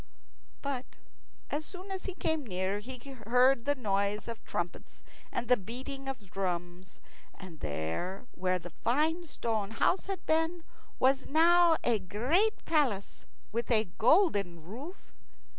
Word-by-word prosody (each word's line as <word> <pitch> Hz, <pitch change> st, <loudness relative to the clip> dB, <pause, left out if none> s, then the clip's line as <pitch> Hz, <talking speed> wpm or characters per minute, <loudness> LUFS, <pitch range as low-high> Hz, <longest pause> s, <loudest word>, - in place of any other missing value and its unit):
But 270 Hz, -3 st, -2 dB, 0.6 s
as 300 Hz, +2 st, -1 dB
soon 370 Hz, +4 st, -8 dB
as 380 Hz, -1 st, -4 dB
he 380 Hz, -, -4 dB
came 320 Hz, -4 st, 0 dB
near 190 Hz, -2 st, -1 dB
he 255 Hz, +5 st, -7 dB, 0.3 s
heard 250 Hz, +1 st, +5 dB
the 285 Hz, 0 st, +2 dB
noise 200 Hz, -3 st, 0 dB
of 230 Hz, -1 st, -6 dB
trumpets 175 Hz, 0 st, -5 dB, 0.3 s
and 240 Hz, -, -2 dB
the 250 Hz, -, +6 dB
beating 260 Hz, +6 st, -5 dB
of 220 Hz, -9 st, -7 dB
drums, 180 Hz, -1 st, -4 dB, 0.4 s
and 180 Hz, -5 st, -11 dB
there 80 Hz, -, -3 dB
where 185 Hz, 0 st, 0 dB
the 175 Hz, -1 st, -9 dB
fine 315 Hz, +8 st, +2 dB
stone 220 Hz, -8 st, -1 dB
house 290 Hz, -, +1 dB
had 390 Hz, -3 st, -4 dB
been 325 Hz, +2 st, +1 dB, 0.3 s
was 265 Hz, +1 st, +3 dB
now 335 Hz, +2 st, +6 dB
a 230 Hz, -3 st, +3 dB
great 250 Hz, -, +1 dB
palace 265 Hz, -12 st, 0 dB, 0.3 s
with 230 Hz, +2 st, -2 dB
a 220 Hz, -5 st, +3 dB
golden 205 Hz, -, +4 dB
roof. 265 Hz, -, -9 dB
240 Hz, 140 wpm, -31 LUFS, 195-310 Hz, 0.6 s, the